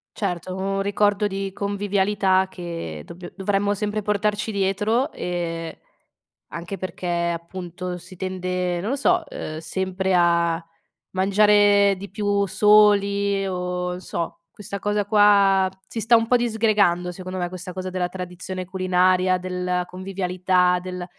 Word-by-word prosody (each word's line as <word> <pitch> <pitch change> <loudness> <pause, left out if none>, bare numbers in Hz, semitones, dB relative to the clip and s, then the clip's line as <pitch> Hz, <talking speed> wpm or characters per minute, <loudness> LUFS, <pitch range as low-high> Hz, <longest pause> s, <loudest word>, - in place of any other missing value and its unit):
Certo, 185 -3 -3
un 195 +1 -1
ricordo 205 +1 +1
di 195 -1 -3
convivialità 200 -1 +1
che 165 - -6
dobbi 175 - -10
dovremmo 200 +1 0
sempre 210 +1 -2
portarci 210 +1 -1
dietro 205 +5 +1
e 165 -2 -4 0.7
anche 170 +4 -6
perché, 185 -1 -6 0.3
appunto, 180 +1 -6
si 180 +2 -13
tende, 180 -1 -2
non 205 +7 -2
lo - - +1
so, 325 +4 +1
ehm, 155 - -6
sempre 190 +3 -2
a 170 -1 +2 0.5
mangiare 200 +1 +4
di 200 +1 -8
più 200 0 0
soli 200 0 +4
o 180 -1 -3
sò 170 -2 -4 0.2
questa 200 +2 -7
cosa 205 0 0
qua 200 -2 +5 0.2
si 225 - -5
sta 225 +2 +4
un 225 0 +3
po' 250 +1 +4
disgregando, 210 -7 +2
secondo 185 +1 -7
me 175 -1 -2
questa 180 0 -7
cosa 185 0 -4
della 180 -1 -2
tradizione 185 0 -6
culinaria, 185 0 +2
della 180 0 -2
convivialità, 180 -1 0
del 180 -1 -6
190 Hz, 135 wpm, -23 LUFS, 180-205 Hz, 0.7 s, qua